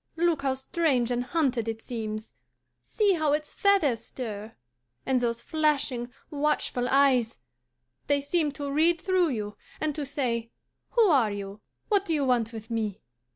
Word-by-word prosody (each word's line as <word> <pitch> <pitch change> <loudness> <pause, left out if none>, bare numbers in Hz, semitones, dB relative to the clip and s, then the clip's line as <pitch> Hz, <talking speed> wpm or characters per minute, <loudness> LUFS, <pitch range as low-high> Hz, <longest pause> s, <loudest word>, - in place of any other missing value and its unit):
"Look 335 -3 +2
how 270 -1 0
strange 265 -3 0
and 245 0 0
hunted 260 -6 0
it 225 0 -3
seems! 220 -2 -5 0.5
See 405 - +2
how 310 -4 +1
its 300 0 -2
feathers 390 - +3
stir! 220 -3 -7 0.5
And 260 -1 +2
those 235 -1 -1
flashing, 285 -6 0 0.2
watchful 290 -4 0
eyes, 260 -4 +3 0.7
they 285 0 +3
seem 295 +2 +1
to 285 -1 -4
read 330 +4 +3
through 370 -1 +2
you, 210 -5 -4 0.2
and 310 -1 0
to 295 - -3
say, 240 -5 -1 0.4
'Who 470 - +5
are 275 - +4
you? 200 0 -6 0.3
What 405 -2 +3
do 325 - +1
you 285 -2 +1
want 240 -3 +2
with 225 0 -9
me? 215 -4 -2
265 Hz, 155 wpm, -27 LUFS, 230-310 Hz, 0.7 s, Who